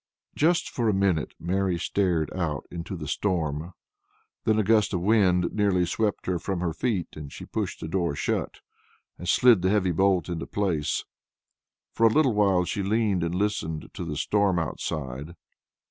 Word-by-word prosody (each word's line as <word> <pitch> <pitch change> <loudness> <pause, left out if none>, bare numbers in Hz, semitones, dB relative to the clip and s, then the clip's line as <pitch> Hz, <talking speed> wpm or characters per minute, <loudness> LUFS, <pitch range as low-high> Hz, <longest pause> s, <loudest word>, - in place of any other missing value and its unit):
Just 170 +3 +2
for 115 -3 -1
a 105 - +2
minute 95 -5 +1
Mary 95 0 0
stared 85 -4 0
out 80 -6 -2
into 85 +2 -5
the 75 -2 -6
storm. 80 -2 -1 0.7
Then 110 -1 +3
a 110 - +3
gust 105 -2 +3
of 90 - -1
wind 90 -4 +3
nearly 100 -4 +2
swept 105 +3 -1
her 90 -2 -1
from 95 +1 -3
her 85 -2 -1
feet, 95 -1 -1
and 75 -2 -8
she - - -9
pushed - - -3
the - - -4
door 85 -3 -1
shut, - - -2 0.6
and 90 - -4
slid 120 0 +5
the 95 - +2
heavy 95 -3 +2
bolt 95 -1 +2
into 85 -2 -4
place. 90 -8 -1 0.9
For 115 - +4
a - - +3
little 140 -2 +3
while 100 -4 +3
she 100 - -2
leaned 100 -2 +1
and 85 +1 -2
listened 90 -6 -2
to - - -5
the 75 -3 -4
storm 100 0 +2
outside. 75 -1 -4
90 Hz, 175 wpm, -26 LUFS, 85-105 Hz, 0.9 s, slid